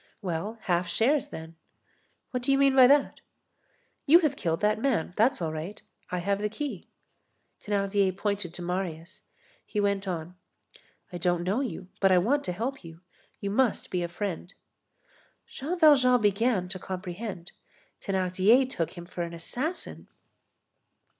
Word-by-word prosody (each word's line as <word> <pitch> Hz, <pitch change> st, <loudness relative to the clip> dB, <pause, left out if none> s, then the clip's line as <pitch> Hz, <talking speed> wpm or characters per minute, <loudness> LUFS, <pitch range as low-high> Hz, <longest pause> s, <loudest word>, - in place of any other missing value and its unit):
"Well, 195 Hz, +4 st, -4 dB
half 175 Hz, -2 st, 0 dB
shares 255 Hz, -, +2 dB
then." 160 Hz, +1 st, -9 dB, 0.7 s
"What 250 Hz, -, -2 dB
do 265 Hz, +3 st, +1 dB
you 275 Hz, -, +4 dB
mean 275 Hz, -1 st, +4 dB
by 255 Hz, -2 st, +9 dB
that?" 285 Hz, +1 st, +3 dB, 0.9 s
"You 315 Hz, +4 st, +9 dB
have 300 Hz, -4 st, +1 dB
killed 165 Hz, -9 st, -1 dB
that 210 Hz, +1 st, +1 dB
man; 230 Hz, -11 st, 0 dB
that's 230 Hz, -2 st, +2 dB
all 160 Hz, -1 st, -2 dB
right. 165 Hz, +7 st, -6 dB, 0.3 s
I 180 Hz, -, -2 dB
have 200 Hz, +3 st, -1 dB
the 210 Hz, -, 0 dB
key." 225 Hz, -, -5 dB, 0.8 s
Thénardier 200 Hz, -2 st, +1 dB
pointed 200 Hz, -4 st, -2 dB
to 175 Hz, -, -5 dB
Marius. 175 Hz, -1 st, -4 dB, 0.4 s
He 210 Hz, -, -4 dB
went 200 Hz, -1 st, 0 dB
on: 170 Hz, -1 st, -4 dB, 0.8 s
"I 175 Hz, -, -4 dB
don't 175 Hz, 0 st, +1 dB
know 195 Hz, +7 st, 0 dB
you, 195 Hz, -8 st, -5 dB
but 195 Hz, -1 st, +4 dB
I 185 Hz, -, +6 dB
want 265 Hz, +11 st, +2 dB
to 180 Hz, -, -2 dB
help 240 Hz, +8 st, -4 dB
you. 165 Hz, 0 st, -12 dB, 0.4 s
You 200 Hz, -, -3 dB
must 245 Hz, +1 st, +1 dB
be 180 Hz, -, 0 dB
a 175 Hz, -, -1 dB
friend." 175 Hz, 0 st, -5 dB, 0.9 s
Jean 315 Hz, +7 st, -4 dB
Valjean 265 Hz, -6 st, +6 dB
began 205 Hz, -2 st, +1 dB
to 185 Hz, -, -4 dB
comprehend. 185 Hz, 0 st, -6 dB, 0.5 s
Thénardier 190 Hz, +6 st, +3 dB
took 170 Hz, -11 st, -4 dB
him 175 Hz, -, -7 dB
for 175 Hz, 0 st, -6 dB
an 170 Hz, 0 st, -4 dB
assassin. 260 Hz, -, -5 dB
195 Hz, 155 wpm, -28 LUFS, 175-245 Hz, 0.9 s, by